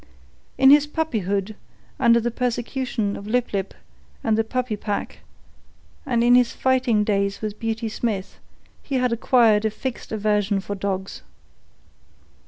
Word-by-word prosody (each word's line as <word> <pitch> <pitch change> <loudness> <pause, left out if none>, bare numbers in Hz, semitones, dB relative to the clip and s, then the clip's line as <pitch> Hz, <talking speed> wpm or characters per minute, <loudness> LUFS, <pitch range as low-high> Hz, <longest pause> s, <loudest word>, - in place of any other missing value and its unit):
In 265 0 +7
his 295 0 +6
puppyhood, 215 - -2 0.4
under 235 -3 +5
the 240 +1 -2
persecution 240 -3 -2
of 200 - -8
Lip 245 +1 0
lip 195 -1 -3 0.5
and 220 -2 +2
the 225 - +2
puppy 250 0 -2
pack, 205 0 -4 0.9
and 240 -3 +1
in 240 +1 +5
his 245 -1 +4
fighting 255 -5 +2
days 200 -1 0
with 215 -1 -4
Beauty 225 0 -2
Smith, 215 -3 -3 0.4
he 275 - -4
had 250 -2 +1
acquired 230 -3 +3
a 220 - +2
fixed 235 +3 -6
aversion 210 -2 +1
for 195 +1 -5
dogs. 195 -1 -4
225 Hz, 140 wpm, -23 LUFS, 205-250 Hz, 0.9 s, In